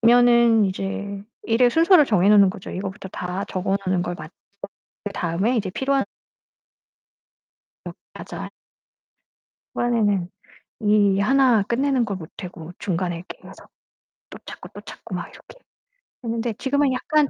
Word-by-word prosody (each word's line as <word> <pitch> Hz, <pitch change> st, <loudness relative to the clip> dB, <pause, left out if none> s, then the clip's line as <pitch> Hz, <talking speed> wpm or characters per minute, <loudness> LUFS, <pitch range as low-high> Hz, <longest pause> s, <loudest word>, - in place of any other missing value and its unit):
그러면은 235 Hz, -1 st, +5 dB
이제 195 Hz, +1 st, -4 dB, 0.2 s
일의 240 Hz, +2 st, +3 dB
순서를 330 Hz, +2 st, +6 dB
정해 195 Hz, -3 st, +3 dB
놓는 200 Hz, -2 st, +6 dB
거죠. 195 Hz, -1 st, -9 dB
이거부터 190 Hz, +1 st, -6 dB
다 180 Hz, +1 st, -4 dB
적어 190 Hz, +1 st, -1 dB
놓는 185 Hz, -1 st, +1 dB
걸 175 Hz, 0 st, -3 dB
맞춰 155 Hz, +1 st, -10 dB, 0.7 s
그 205 Hz, -, -4 dB
다음에 190 Hz, +7 st, 0 dB
이제 200 Hz, -4 st, -1 dB
필요한 270 Hz, +6 st, 0 dB, 1.8 s
어 -, -, -5 dB, 0.2 s
맞아요. -, -, -7 dB, 1.2 s
초반에는 205 Hz, -7 st, +1 dB, 0.5 s
이 205 Hz, -2 st, +3 dB
하나 250 Hz, -1 st, +4 dB
끝내는 255 Hz, +3 st, +1 dB
걸 200 Hz, -3 st, -4 dB
못하고 170 Hz, 0 st, -9 dB
중간에 175 Hz, -2 st, -2 dB
이렇게 170 Hz, -, -10 dB
해서 -, -, -14 dB, 0.6 s
또 -, -, -10 dB
찾고, -, -, -10 dB
또 -, -, -9 dB
찾고 -, -, -9 dB
막 -, -, -4 dB
이렇게 -, -, -16 dB, 0.6 s
했는데 230 Hz, 0 st, -2 dB
지금은 275 Hz, +4 st, +1 dB
약간 300 Hz, +2 st, +1 dB
210 Hz, 285 characters per minute, -23 LUFS, 190-245 Hz, 1.8 s, 순서를